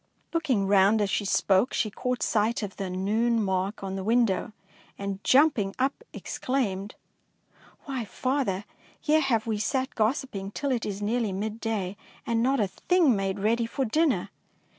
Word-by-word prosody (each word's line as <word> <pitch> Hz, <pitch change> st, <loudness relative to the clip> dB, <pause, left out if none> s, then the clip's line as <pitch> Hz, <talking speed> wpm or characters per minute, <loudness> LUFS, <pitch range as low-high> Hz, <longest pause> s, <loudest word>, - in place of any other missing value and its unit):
Looking 275 Hz, -12 st, +1 dB
round 200 Hz, +2 st, +4 dB
as 205 Hz, -2 st, 0 dB
she 205 Hz, -, 0 dB
spoke, 195 Hz, +3 st, +2 dB
she 215 Hz, -, 0 dB
caught 250 Hz, +3 st, -2 dB
sight 220 Hz, +1 st, +1 dB
of 200 Hz, -2 st, -6 dB
the 195 Hz, -2 st, -3 dB
noon 215 Hz, +5 st, +1 dB
mark 190 Hz, +2 st, -1 dB
on 195 Hz, 0 st, -3 dB
the 190 Hz, -, -4 dB
window, 225 Hz, -2 st, +2 dB, 0.5 s
and, 200 Hz, 0 st, -5 dB
jumping 255 Hz, -8 st, +4 dB
up, 275 Hz, -, -1 dB
exclaimed, 210 Hz, -6 st, -2 dB, 0.3 s
— -, -, -43 dB
" -, -, -27 dB
Why, 265 Hz, -5 st, -3 dB
father, 245 Hz, -5 st, -1 dB, 0.3 s
here 310 Hz, 0 st, +3 dB
have 230 Hz, -7 st, +1 dB
we 220 Hz, -2 st, -1 dB
sat 260 Hz, +4 st, -1 dB
gos 235 Hz, +6 st, +1 dB
siping 195 Hz, -5 st, -7 dB
till 280 Hz, -2 st, -1 dB
it 240 Hz, -4 st, -1 dB
is 205 Hz, 0 st, -4 dB
nearly 225 Hz, 0 st, 0 dB
midday 210 Hz, -1 st, -3 dB, 0.3 s
and 230 Hz, -1 st, +1 dB
not 265 Hz, +2 st, +2 dB
a 210 Hz, -, +3 dB
thing 295 Hz, -, +2 dB
made 195 Hz, 0 st, -1 dB
ready 225 Hz, +3 st, +1 dB
for 265 Hz, +3 st, -2 dB
dinner 305 Hz, +5 st, +1 dB
220 Hz, 170 wpm, -27 LUFS, 195-255 Hz, 0.5 s, round